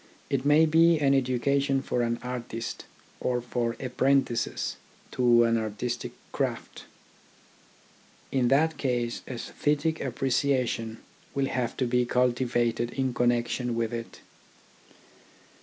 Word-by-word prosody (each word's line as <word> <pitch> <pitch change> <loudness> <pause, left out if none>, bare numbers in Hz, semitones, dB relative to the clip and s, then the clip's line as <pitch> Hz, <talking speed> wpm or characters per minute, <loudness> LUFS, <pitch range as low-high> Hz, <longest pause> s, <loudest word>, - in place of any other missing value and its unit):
It 135 -2 +1
may 150 +2 +6
be 165 +1 +5
an 140 -2 +3
education 135 +1 +1
for 125 - -1
an 120 0 0
artist 120 -2 -5 0.3
or 125 -1 0
for 120 -1 -2
apprentices 130 -1 0 0.3
to 120 -1 +4
an 115 0 +2
artistic 110 +3 -4 0.2
craft. - - -3 1.5
In 130 -3 +2
that 145 +3 +2
case 120 -3 -1
aesthetic 150 +5 -1
appre 130 +1 -2
ciation 120 -4 0 0.4
will 140 -1 +1
have 125 -3 -2
to 130 - +1
be 125 0 +1
cultivated 120 -1 +1
in 130 -1 -1
connection 120 0 0
with 115 0 -1
it. 115 -1 -6
125 Hz, 115 wpm, -27 LUFS, 120-135 Hz, 1.5 s, may